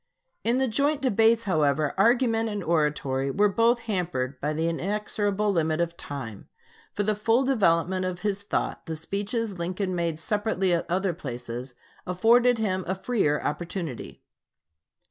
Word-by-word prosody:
In 235 +2 +2
the 265 0 +2
joint 280 +6 +1
debates, 225 -1 +3
however, 155 -6 +1
argument 225 +1 +3
and 205 -2 -3
oratory 150 -5 0
were 205 +9 +3
both 230 +3 +2
hampered 170 - -2
by 150 - 0
the 160 +2 -1
inexorable 205 +3 -1
limit 160 -3 0
of 170 0 -1
time. 120 -11 -7 0.4
For 205 - -1
the 215 +1 +1
full 225 +5 +2
development 185 -7 +2
of 180 -1 -4
his 205 -1 -1
thought, 200 - -3
the 160 - -3
speeches 200 +4 -3
Lincoln 185 +2 -2
made 170 -3 -1
separately 200 0 0
at 170 - -1
other 185 +1 0
places 125 -4 -7 0.3
afforded 235 +7 +4
him 190 -4 -1
a 190 - 0
freer 190 -8 0
opportunity. 150 - -4
185 Hz, 145 wpm, -26 LUFS, 160-220 Hz, 0.4 s, afforded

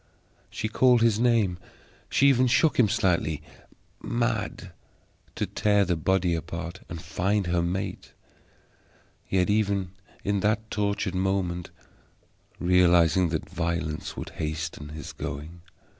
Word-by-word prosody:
She 110 - -3
called 120 +1 +4
his 110 -2 +3
name, 115 -7 +2 0.5
she 140 - +4
even 130 -2 +4
shook 130 +4 +3
him 110 -4 +5
slightly, 85 -8 +1 0.6
mad 115 -5 -2 0.6
to - - -1
tear 105 -1 +2
the 90 -1 +1
body 90 +2 +1
apart 85 +2 -5
and 85 - -6
find 95 +4 -1
her 90 0 +1
mate, 95 +2 -3 1.2
yet 90 -1 +2
even 100 -3 +1 0.3
in 100 0 0
that 110 +2 0
tortured 100 -3 -1
moment 95 -2 -1 0.9
realizing 90 -1 +4
that 80 -1 -3
violence 85 -2 -3
would - - -5
hasten 75 -1 -4
his 75 -2 -8
going. 75 +5 -6
95 Hz, 120 wpm, -26 LUFS, 85-105 Hz, 1.2 s, him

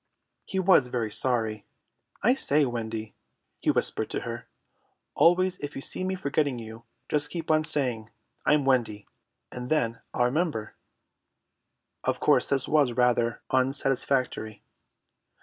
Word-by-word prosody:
He 190 - -4
was 185 -8 +5
very 120 -3 -2
sorry. 110 -3 0 0.6
"I 245 +5 +5
say, 150 - +2
Wendy," 110 -3 -4 0.5
he - - -1
whispered - - 0
to - - -3
her, - - -6 0.7
"always 180 +2 +3
if 145 0 -6
you - - -5
see - - -2
me 190 0 -1
forgetting 145 -5 0
you, 115 0 -9 0.2
just 150 0 0
keep 165 -1 -3
on 155 0 +3
saying 125 -8 0 0.3
'I'm 150 -2 +3
Wendy,' 115 -6 +1 0.4
and 125 0 -6
then 115 -7 0
I'll 120 - +1
remember." 135 -5 -1 1.3
Of - - 0
course - - +3
this 135 -2 +1
was 145 -5 +3
rather 120 -1 +1
unsatisfactory. 130 -4 0
130 Hz, 130 wpm, -27 LUFS, 115-150 Hz, 1.3 s, was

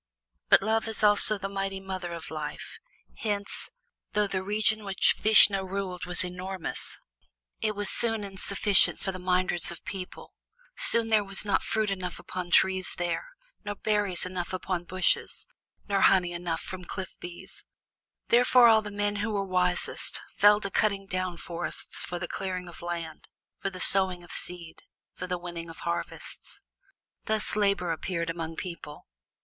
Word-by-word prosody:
But - - +6
Love 220 +2 0
is 220 -1 0
also 210 0 +6
the 195 0 -5
mighty 195 0 -4
mother 190 -2 -6
of 165 -2 -7
life, 155 -1 -7 0.4
hence, 205 -2 -3 0.4
though 210 0 +2
the 190 -2 -2
region 215 +2 +1
which 195 -1 +2
Vishnu 210 -2 +6
ruled 185 -2 -5
was 180 0 0
enormous, 180 0 -5 0.6
it 215 -1 -1
was 205 0 -3
soon 225 -2 +1
insufficient 200 +1 +3
for 190 - -3
the 185 - -8
myriads 180 -1 0
of 170 - -8
people; 185 -2 -8 0.4
soon 230 -1 +7
there 215 -2 +3
was 195 +1 -1
not 200 - +1
fruit 215 -2 -1
enough 180 -2 -4
upon 180 -1 -6
trees 190 +1 +3
there, 175 - -3 0.4
nor 205 0 -5
berries 205 -4 +2
enough 180 -1 -5
upon 180 -1 -3
bushes, 185 0 0 0.4
nor 200 -2 0
honey 180 -2 +4
enough 175 -1 -4
from 185 -1 -8
cliff 190 +2 -7
bees. 175 0 -10 0.7
Thereupon 245 0 +6
all 220 -1 +5
the 210 - -7
men 205 0 -2
who 210 +3 -2
were 200 -1 -1
wisest 180 -1 0 0.2
fell 205 0 +5
to 200 - -4
cutting 200 -1 0
down 185 -2 -3
forests 170 +1 0
for 175 - -5
the 175 0 -5
clearing 185 -1 -5
of 170 - -11
land, 170 -2 -6 0.3
for - - -2
the 185 -1 -10
sowing 185 -2 +6
of 175 - -13
seed, 170 -2 -3 0.3
for 185 - -7
the 180 0 -2
winning 175 -1 -8
of 165 - -11
harvests. 170 0 -6 0.7
Thus 215 -1 -1
Labor 200 -4 +1
appeared 170 0 -3
among 165 -1 -6
people. 170 -5 -8
190 Hz, 160 wpm, -27 LUFS, 175-205 Hz, 0.7 s, soon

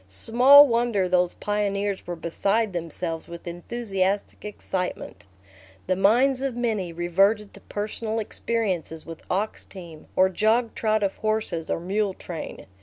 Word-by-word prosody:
Small 250 - +7
wonder 230 -5 +1
those 180 -1 +2
pioneers 205 -2 -2
were 175 - -3
beside 200 +6 0
themselves 165 -1 -4
with 170 0 -10
enthusiastic 195 +2 -2
excitement. 180 - -5 0.6
The 185 - +1
minds 245 +8 +3
of 270 -3 -2
many 220 -7 -1
reverted 195 +5 +1
to - - -13
personal 215 +2 -4
experiences 200 -7 -2
with 165 -1 -9
ox 205 +4 -2
team, 170 -5 -12
or 185 - +5
jogtrot 220 +1 +1
of 195 - -1
horses 215 -7 -2
or - - 0
mule 195 +2 -1
train. 170 -3 -7
200 Hz, 130 wpm, -25 LUFS, 175-220 Hz, 0.6 s, Small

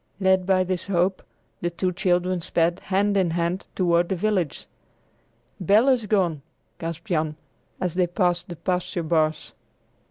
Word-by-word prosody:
Led 190 -1 +3
by 185 -1 +4
this 185 0 -3
hope, 185 0 +1 0.4
the 175 - 0
two 180 +2 -1
children 180 -1 0
sped, 170 0 +1
hand 200 +1 +1
in 190 -3 +2
hand, 170 +3 -1
toward 175 -2 +2
the 190 - 0
village. 185 -4 -1 0.9
"Bel 210 +8 +4
is 245 -5 +2
gone!" 180 -8 +1 0.4
gasped 165 0 -5
Jan, 155 -6 -1 0.4
as 180 -3 -1
they 180 -1 +2
passed 175 -1 0
the 175 - -5
pasture 180 0 -2
bars. 155 -1 0
180 Hz, 150 wpm, -24 LUFS, 170-190 Hz, 0.9 s, by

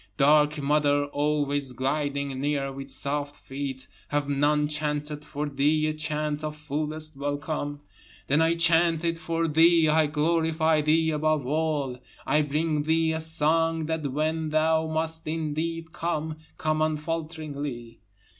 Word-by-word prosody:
Dark 150 +1 +4
mother 145 0 +2
always 145 -2 -1
gliding 140 0 -2
near 140 -1 0
with 135 0 -8
soft 145 +2 -2
feet, 135 -2 -6 0.2
Have 145 -1 -1
none 145 +1 +2
chanted 150 0 -3
for 150 0 -4
thee 145 +2 +2
a 155 - 0
chant 155 -1 -2
of 155 0 -3
fullest 155 +1 -4
welcome? 145 +1 -3 0.4
Then 145 +3 +3
I 165 +1 +3
chant 170 0 +3
it 165 0 0
for 165 0 -1
thee, 165 +1 +5
I 155 0 +4
glorify 160 +1 +2
thee 160 +2 +2
above 155 -2 +1
all, 145 -3 -1 0.3
I 150 +3 +3
bring 150 +1 0
thee 160 +1 +2
a 160 - -2
song 160 0 +1
that 155 -3 -2
when 155 +2 -1
thou 160 +1 +2
must 160 0 -2
indeed 160 +1 -3
come, 155 -1 -2 0.2
come 155 0 0
unfalteringly. 155 -5 -3
150 Hz, 135 wpm, -26 LUFS, 145-160 Hz, 0.4 s, thee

